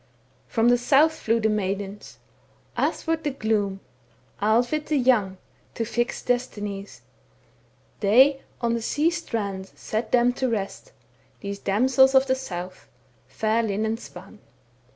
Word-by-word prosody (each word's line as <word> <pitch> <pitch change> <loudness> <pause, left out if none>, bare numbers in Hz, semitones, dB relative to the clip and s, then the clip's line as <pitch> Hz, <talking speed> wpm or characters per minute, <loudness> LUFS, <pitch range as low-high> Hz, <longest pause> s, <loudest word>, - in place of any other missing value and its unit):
From 230 +1 +2
the 245 0 +4
south 285 +6 +4
flew 230 +1 +1
the 220 - +2
maidens 200 -1 -3 0.6
Athwart 325 -1 -1
the 295 - 0
gloom, 215 -6 -1 0.6
Alvit 240 +8 +1
the 305 - +1
young, 230 -8 +2 0.4
To 230 - -2
fix 240 +2 -2
destinies; 205 - -3 1.0
They 265 +7 +5 0.2
on 235 -1 +1
the 235 - -1
sea 300 +8 +1
strand 205 - -4
Sat 220 +1 -4
them 245 0 +4
to 260 0 -1
rest, 220 - -4 0.5
These 200 -1 -5
damsels 260 +6 +3
of 265 0 +6
the 260 - +2
south 185 -8 -7 0.4
Fair 220 +1 0
linen 220 +1 -1
spun. - - -11
n. - - -17
230 Hz, 130 wpm, -24 LUFS, 205-260 Hz, 1.0 s, of